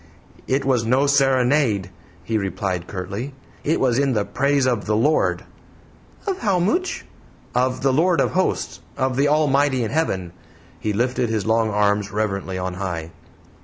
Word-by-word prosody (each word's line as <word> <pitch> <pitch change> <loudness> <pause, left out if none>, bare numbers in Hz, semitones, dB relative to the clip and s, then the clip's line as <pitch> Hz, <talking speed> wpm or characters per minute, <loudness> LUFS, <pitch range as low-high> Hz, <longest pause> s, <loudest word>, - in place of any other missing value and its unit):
"It 135 +1 0
was 130 -4 +2
no 130 +5 +2
serenade," 135 -7 +2 0.3
he 115 - -3
replied, 95 -3 -2
curtly; 100 +8 -5 0.3
"it 155 - +1
was 125 -1 +2
in 140 -2 +2
the 105 -3 0
praise 140 +5 +1
of 120 -5 0
the 105 - +2
Lord!" 145 +8 +2 0.8
"Of 390 -3 -2
how 200 -6 +1
mooch?" 345 - 0 0.5
"Of 130 +1 0
the 135 -1 +3
Lord 170 +3 +3
of - - +2
Hosts 185 0 -1 0.2
of 130 -1 0
the 140 +3 +3
Almighty 145 -3 +2
in 110 - -3
Heaven." 95 - -1 0.5
He 110 - -1
lifted 120 +2 0
his 110 -2 -1
long 110 0 +2
arms 105 -1 +1
reverently 100 -3 -2
on 90 0 -3
high. 85 -3 -4
125 Hz, 160 wpm, -22 LUFS, 100-140 Hz, 0.8 s, the